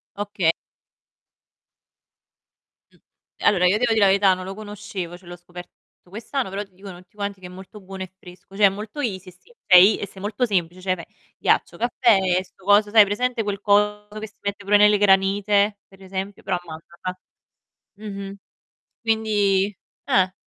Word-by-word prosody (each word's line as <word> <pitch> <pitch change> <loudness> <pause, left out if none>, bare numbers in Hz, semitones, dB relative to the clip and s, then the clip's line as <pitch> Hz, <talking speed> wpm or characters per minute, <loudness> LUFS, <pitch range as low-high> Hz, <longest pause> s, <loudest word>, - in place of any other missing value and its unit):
Oka 205 -2 -4 2.5
Mh. - - -26 0.5
Allora, 180 -3 +4
io 185 +3 +4
devo 235 0 +1
dì 220 - +1
la 205 - +5
verità 195 0 +4
non 185 0 -6
lo 190 - -6
conoscevo, 205 -4 -7
cioè 180 0 -20
l'ho 175 - -8
scoperto 175 0 -12 0.4
quest'anno, 230 +4 -4
però 195 +2 -4
ti 195 -2 -22
dicono 190 -2 -11
tutti 185 +2 -28
quanti 200 -1 -4
che 180 - -9
è - - -12
molto 190 +3 -12
buono 190 0 -8
e 185 - -11
fresco, 180 +1 -15
cioè 205 0 +6
è - - +3
molto 210 +8 -8
easy 190 -9 -3
esti 185 - -21
sei 185 +3 +7
e - - -4
sei 190 - -14
molto 210 +5 -1
semplice, 180 -5 -1
cioè 185 0 0
pe 170 - -11 0.3
ghiaccio, - - +1
caffè, 235 -2 +3 0.2
e 185 - -1
sto 190 - -24
coso, 205 +2 +4
sai 220 - +5
hai 210 - +9
presente 240 +4 -1
quel 205 -1 -3
coso 210 0 +1
che 220 - -6
si 205 - -23
mette 200 0 -4
pure 205 +1 +4
nelle 210 0 +5
granite, 200 +1 +3
per 195 0 -20
esempio, 190 +1 -6
però 190 - -1
a - - -10
mandorla. 170 +3 -8 1.1
Mh-mh. 195 0 -8 0.7
Quindi 210 -3 +1 0.3
Eh, 185 -1 +2
200 Hz, 180 wpm, -22 LUFS, 185-210 Hz, 2.5 s, hai